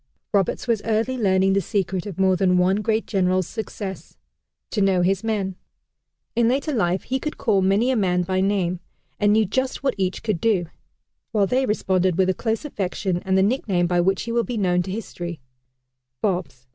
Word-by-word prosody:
Roberts 200 Hz, +4 st, +1 dB
was 230 Hz, -3 st, +1 dB
early 225 Hz, +3 st, 0 dB
learning 195 Hz, -4 st, +2 dB
the 195 Hz, -, +2 dB
secret 190 Hz, -1 st, -2 dB
of 195 Hz, -, -7 dB
more 190 Hz, -1 st, +4 dB
than 180 Hz, -1 st, +2 dB
one 185 Hz, +2 st, +3 dB
great 220 Hz, +1 st, 0 dB
general's 185 Hz, -2 st, +1 dB
success 200 Hz, -3 st, -6 dB, 0.5 s
to 210 Hz, -, 0 dB
know 190 Hz, -2 st, +3 dB
his 195 Hz, +2 st, +1 dB
men. 200 Hz, -4 st, -1 dB, 0.8 s
In 235 Hz, 0 st, +3 dB
later 275 Hz, +5 st, 0 dB
life 185 Hz, -6 st, 0 dB
he 265 Hz, +2 st, -2 dB
could 305 Hz, +3 st, -4 dB
call 200 Hz, -4 st, +2 dB
many 200 Hz, +7 st, +3 dB
a -, -, +1 dB
man 180 Hz, -4 st, +1 dB
by 185 Hz, +1 st, 0 dB
name, 190 Hz, -3 st, 0 dB, 0.4 s
and 205 Hz, 0 st, +3 dB
knew 215 Hz, +1 st, +4 dB
just 260 Hz, +8 st, -2 dB
what 270 Hz, -2 st, +2 dB
each 185 Hz, -1 st, -1 dB
could 215 Hz, -7 st, -1 dB
do. 205 Hz, -6 st, +2 dB, 0.7 s
While 205 Hz, -2 st, +3 dB
they 255 Hz, +5 st, +1 dB
responded 185 Hz, -4 st, +1 dB
with 190 Hz, -1 st, +3 dB
a -, -, -1 dB
close 225 Hz, +7 st, -2 dB
affection 195 Hz, -7 st, -2 dB
and 190 Hz, 0 st, +2 dB
the 190 Hz, -, +4 dB
nickname 200 Hz, -5 st, +1 dB
by 175 Hz, 0 st, +2 dB
which 190 Hz, +1 st, +1 dB
he 230 Hz, -, -4 dB
will 235 Hz, 0 st, +2 dB
be 230 Hz, +3 st, -4 dB
known 180 Hz, -3 st, +2 dB
to 185 Hz, -, -5 dB
history 175 Hz, -5 st, -5 dB, 0.8 s
"Bobs." 175 Hz, -10 st, -2 dB
195 Hz, 195 wpm, -23 LUFS, 185-220 Hz, 0.8 s, more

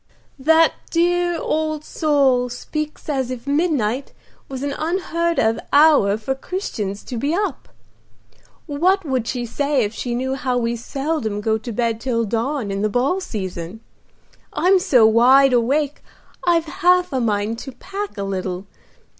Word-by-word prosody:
"The 320 Hz, +4 st, +5 dB, 0.2 s
dear 350 Hz, 0 st, +1 dB
old 310 Hz, -1 st, -1 dB
soul 275 Hz, -5 st, +2 dB
speaks 305 Hz, +5 st, -5 dB
as 265 Hz, -4 st, -1 dB
if 255 Hz, -1 st, -6 dB
midnight 280 Hz, -5 st, 0 dB, 0.4 s
was 265 Hz, 0 st, -5 dB
an 285 Hz, 0 st, -2 dB
unheard 335 Hz, 0 st, -1 dB
of 225 Hz, 0 st, +2 dB
hour 285 Hz, -9 st, +5 dB
for 225 Hz, +5 st, -2 dB
Christians 225 Hz, -, -4 dB
to 245 Hz, -, -6 dB
be 285 Hz, +8 st, 0 dB
up. 390 Hz, -7 st, -3 dB, 1.0 s
What 350 Hz, +6 st, +1 dB
would 260 Hz, -5 st, -1 dB
she 245 Hz, -2 st, -2 dB
say 280 Hz, +2 st, 0 dB
if 210 Hz, +1 st, -3 dB
she 240 Hz, +1 st, -3 dB
knew 260 Hz, +2 st, -1 dB
how 260 Hz, -2 st, -1 dB
we 235 Hz, -1 st, 0 dB
seldom 255 Hz, -3 st, -3 dB
go 220 Hz, +1 st, 0 dB
to 235 Hz, +2 st, -6 dB
bed 230 Hz, 0 st, -1 dB
till 230 Hz, -3 st, 0 dB
dawn 230 Hz, +1 st, -2 dB
in 195 Hz, 0 st, -2 dB
the 215 Hz, -, +1 dB
ball 260 Hz, -, +1 dB
season? 185 Hz, -, -5 dB, 0.7 s
I'm 375 Hz, +1 st, +3 dB
so 250 Hz, -10 st, +4 dB
wide 255 Hz, +4 st, +6 dB
awake 275 Hz, +5 st, +1 dB, 0.5 s
I've 335 Hz, -2 st, +3 dB
half 360 Hz, +2 st, +2 dB
a 260 Hz, -, +1 dB
mind 215 Hz, 0 st, -1 dB
to 270 Hz, -, -7 dB
pack 395 Hz, -, -6 dB
a 200 Hz, -, -2 dB
little. 185 Hz, -1 st, -3 dB
265 Hz, 155 wpm, -21 LUFS, 225-310 Hz, 1.0 s, wide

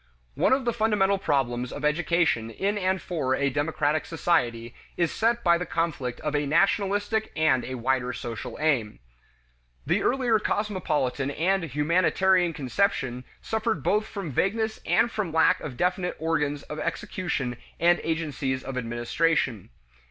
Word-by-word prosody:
One -, -, +2 dB
of 260 Hz, -1 st, +2 dB
the 235 Hz, -, +1 dB
fundamental 210 Hz, -3 st, +2 dB
problems 125 Hz, -, 0 dB
of -, -, -4 dB
education 150 Hz, -6 st, +1 dB
in 195 Hz, -, -1 dB
and 190 Hz, -1 st, 0 dB
for 145 Hz, -9 st, -1 dB
a 140 Hz, 0 st, 0 dB
democratic 150 Hz, +1 st, 0 dB
society 120 Hz, -9 st, 0 dB, 0.2 s
is 170 Hz, -2 st, +1 dB
set 235 Hz, +1 st, +1 dB
by 170 Hz, -1 st, +4 dB
the 180 Hz, -, -3 dB
conflict 160 Hz, -8 st, -2 dB
of 150 Hz, -1 st, -2 dB
a 145 Hz, -1 st, 0 dB
nationalistic 205 Hz, +6 st, +1 dB
and 135 Hz, -6 st, +3 dB
a 130 Hz, -, -5 dB
wider 125 Hz, +1 st, 0 dB
social 115 Hz, -1 st, -6 dB
aim. 135 Hz, -9 st, +1 dB, 0.9 s
The -, -, +1 dB
earlier 245 Hz, -4 st, +2 dB
cosmopolitan 170 Hz, -11 st, -1 dB
and 175 Hz, +5 st, 0 dB
"humanitarian" 175 Hz, +5 st, +2 dB
conception 135 Hz, -, -1 dB, 0.2 s
suffered 220 Hz, -, -1 dB
both 210 Hz, +6 st, +1 dB
from 195 Hz, -7 st, -5 dB
vagueness 220 Hz, -, 0 dB
and 235 Hz, -, +3 dB
from 210 Hz, -7 st, -2 dB
lack 160 Hz, 0 st, +4 dB
of 130 Hz, -5 st, -6 dB
definite 180 Hz, +2 st, 0 dB
organs 150 Hz, -3 st, -1 dB
of 150 Hz, -, -7 dB
execution 160 Hz, -, -3 dB, 0.2 s
and 175 Hz, +1 st, +4 dB
agencies 145 Hz, -5 st, -2 dB
of 130 Hz, -1 st, -4 dB
administration. 120 Hz, -, 0 dB
160 Hz, 145 wpm, -26 LUFS, 135-195 Hz, 0.9 s, by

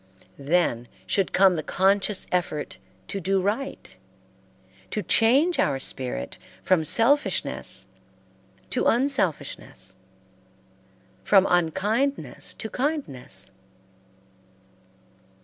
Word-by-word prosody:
Then 140 Hz, -5 st, 0 dB, 0.2 s
should 195 Hz, -2 st, 0 dB
come 190 Hz, -1 st, +5 dB
the 160 Hz, -, -2 dB
conscious 195 Hz, +4 st, +1 dB
effort 170 Hz, -4 st, -2 dB, 0.3 s
to 195 Hz, -, -4 dB
do 190 Hz, +2 st, +1 dB
right, 215 Hz, +9 st, -3 dB, 0.9 s
to 210 Hz, -, -3 dB
change 270 Hz, -, +3 dB
our 140 Hz, -2 st, +2 dB
spirit 125 Hz, -, -4 dB, 0.2 s
from 185 Hz, -4 st, +2 dB
selfishness 245 Hz, -, +2 dB, 0.9 s
to -, -, +1 dB
unselfishness, 190 Hz, -, -1 dB, 1.3 s
from 195 Hz, -, +5 dB
unkindness 200 Hz, -, 0 dB
to 220 Hz, -, -6 dB
kindness. 220 Hz, -, -3 dB
190 Hz, 80 wpm, -25 LUFS, 155-230 Hz, 1.3 s, come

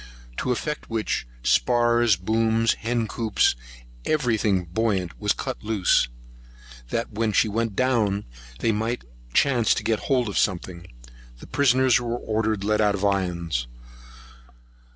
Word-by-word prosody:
To 130 Hz, -, -1 dB
effect 150 Hz, +5 st, -3 dB
which, 110 Hz, -, -2 dB, 0.2 s
spars, 120 Hz, -, +3 dB
booms, 110 Hz, +4 st, +1 dB
hen 115 Hz, 0 st, -2 dB
coops, 110 Hz, 0 st, +1 dB
and -, -, -18 dB, 0.3 s
every 125 Hz, -7 st, +1 dB
thing 100 Hz, -4 st, +1 dB
buoyant 95 Hz, -1 st, -1 dB
was 105 Hz, -1 st, +2 dB
cut 130 Hz, -4 st, -4 dB
loose, 105 Hz, -, +2 dB, 0.8 s
that 115 Hz, -, -2 dB
when 110 Hz, +1 st, 0 dB
she 110 Hz, -, +3 dB
went 110 Hz, 0 st, -2 dB
down, 110 Hz, -6 st, +1 dB, 0.4 s
they 115 Hz, -, +2 dB
might 110 Hz, +3 st, -2 dB, 0.3 s
chance 125 Hz, -5 st, +3 dB
to 115 Hz, -, -3 dB
get 110 Hz, 0 st, 0 dB
hold 125 Hz, -4 st, +2 dB
of 100 Hz, -, -1 dB
something. 90 Hz, -2 st, -2 dB, 0.5 s
The -, -, -12 dB
prisoners 130 Hz, -2 st, +3 dB
were 120 Hz, 0 st, -2 dB
ordered 110 Hz, -2 st, -1 dB
to -, -, -4 dB
be -, -, -1 dB
let 105 Hz, 0 st, +2 dB
out 105 Hz, -1 st, +3 dB
of 100 Hz, +1 st, -2 dB
irons. 85 Hz, -9 st, -1 dB
110 Hz, 150 wpm, -24 LUFS, 100-120 Hz, 0.8 s, spars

